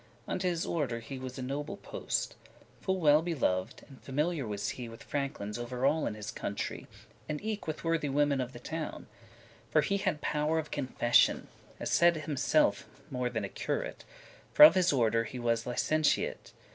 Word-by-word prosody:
Unto 185 - -1
his 170 -1 -1
order 135 -8 -1
he 130 +3 -7
was 130 0 -7
a 130 - -4
noble 145 +8 -4
post; - - -3 0.4
Full 190 -1 -1
well 150 -2 +5
belov'd, 130 - -1
and 135 -3 -15
familiar 150 0 -1
was 105 -1 -2
he 120 -2 -6
With 115 - -11
franklins 130 -7 -3
*over 125 +2 -3
all* 150 +3 +2
in - - -3
his 105 0 -6
country, 100 - -4
*everywhere* - - -22
And 150 -1 -3
eke 215 -3 -3
with 155 - -4
worthy 165 -3 0
women 145 -1 +2
of 125 0 -4
the - - -10
town: 160 -1 -5 0.6
For - - +4
he 200 - +1
had 190 -6 -1
power 150 +2 0
of 155 -1 -3
confession, 130 -3 +2 0.3
As - - -3
said 170 0 +5
himselfe, 145 -3 +1 0.2
more 125 -1 -1
than 115 -4 -2
a - - -6
curate, - - -3 0.5
For 300 - +10
of 305 - +11
his 185 -2 +3
order 115 -4 +2
he 125 - -7
was 115 -1 0
licentiate. 155 +5 0
140 Hz, 185 wpm, -31 LUFS, 120-160 Hz, 0.6 s, of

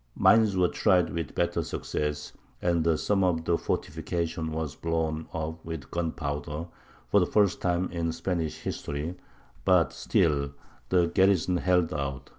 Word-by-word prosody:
Mines 110 -3 +5
were 90 -1 +4
tried 90 -2 +2
with 85 -4 -4
better - - +1
success, 75 0 -3 0.3
and 85 -2 +2
some 100 -2 +1
of 85 -3 +1
the 85 - +3
fortifications 85 -1 -2
were 80 0 -2
blown 80 -1 -1
up 80 +1 -4
with 80 -4 -7
gunpowder, 80 -2 -3 0.5
for 100 - +6
the 90 - +2
first 100 -3 +2
time 90 0 +1
in 85 -1 -1
Spanish 80 -2 -2
history; 75 +4 -3 0.5
but - - +4
still 70 -3 +1 0.4
the 90 -2 +4
garrison 95 0 +3
held 90 -2 +2
out. 70 -3 -4
85 Hz, 140 wpm, -28 LUFS, 80-90 Hz, 0.5 s, for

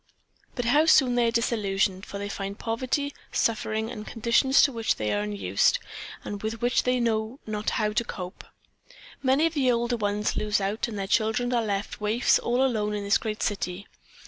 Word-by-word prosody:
But 245 - -2
how 295 +7 +4
soon 265 -6 +5
they 240 -1 +3
are - - +1
disillusioned, 200 -5 0
for 200 - -6
they 200 0 -4
find 200 0 -5
poverty, 255 +5 -2 0.2
suffering 220 0 0
and 215 -3 -7
conditions 235 +4 +3
to 280 - +4
which 230 -3 0
they 105 -1 -1
are 105 - 0
unused 100 -2 +1 0.5
and 205 -1 -6
with 220 +1 -3
which 245 +2 +2
they 250 0 +1
know 225 +2 -1
not 215 -1 -2
how 210 -1 0
to 225 - +1
cope. 185 -5 -7 0.8
Many 270 +3 +3
of 330 - 0
the 265 -5 +2
older 240 0 0
ones 210 0 -1
lose 210 -1 0
out 200 +4 -1
and 220 -3 -6
their 195 - -2
children 220 +4 +1
are 240 - +2
left 205 0 -3
waifs 215 +4 +3
all 245 +3 +1
alone 210 -5 0
in 205 - -3
this 200 0 +3
great 215 -1 -3
city. 195 -1 -2
220 Hz, 195 wpm, -26 LUFS, 205-245 Hz, 0.8 s, soon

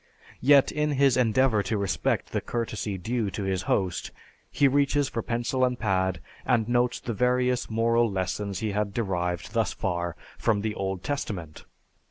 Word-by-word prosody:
Yet, 140 +1 +6
in 150 0 0
his 135 -2 +4
endeavor 125 -2 +3
to 105 +3 -1
respect 100 -1 -1
the - - -1
courtesy 110 -4 -3
due 110 +3 -1
to 100 +2 -4
his 95 -1 -1
host, 95 -3 0 0.4
he 140 - +3
reaches 140 +1 +2
for 115 - -3
pencil 120 +3 -1
and 125 -1 +2
pad, 95 - 0 0.2
and 115 -4 +2
notes 120 0 +1
the 120 - -4
various 125 +2 +1
moral 115 +1 +2
lessons 95 +1 -2
he 110 -2 -1
had 100 -1 -2
derived 90 -6 -2
thus - - +1
far 85 -1 -2 0.2
from 110 -3 +1
the 110 0 -2
Old 95 -2 -3
Testament. 100 - -4
110 Hz, 165 wpm, -27 LUFS, 95-125 Hz, 0.4 s, Yet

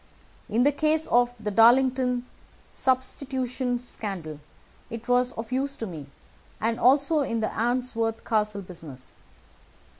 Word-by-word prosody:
In 235 +3 +2
the 290 - +5
case 310 +2 +1
of 245 0 +2
the 210 -1 -3
Darlington 250 +3 +4 0.5
Substitution 260 -1 -1
Scandal 195 -10 -6 0.5
it 230 0 -7
was 245 0 +3
of 225 +1 -7
use 275 +2 -1
to 225 - -4
me, 160 -8 -8 0.5
and 230 +2 0
also 280 +6 +4
in 230 -5 -1
the 220 - 0
Arnsworth 230 -1 -1
Castle 210 -2 0
business. 160 -8 -9
245 Hz, 125 wpm, -26 LUFS, 220-260 Hz, 0.5 s, the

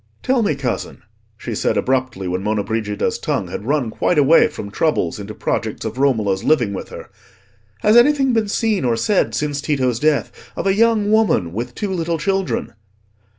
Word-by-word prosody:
"Tell 260 -2 +2
me, 200 -9 +1
cousin," 130 -3 -4 0.3
she - - -6
said - - 0
abruptly, 130 -7 -1
when 90 +1 -2
Monna 105 0 -1
Brigida's 110 -2 -2
tongue - - -2
had 105 - -6
run 140 -6 0
quite 175 - 0
away 150 +3 +5
from 100 - -8
troubles 110 - 0
into 105 +1 -7
projects 110 0 -3
of 110 +3 -5
Romola's 110 -9 +1
living 125 -10 +2
with 95 - -6
her, - - -10 0.7
"has 210 +2 +4
anything 270 +1 +4
been 225 -2 +1
seen 210 -3 0
or 120 -2 +1
said 200 - +1
since 145 -1 -2
Tito's 130 -6 0
death 150 0 +1 0.2
of - - -4
a 195 - +3
young 215 -1 +2
woman 215 - +2
with 120 +4 -5
two 205 -2 -3
little 170 -2 -1
children?" 195 +3 -2
140 Hz, 180 wpm, -19 LUFS, -, 0.7 s, away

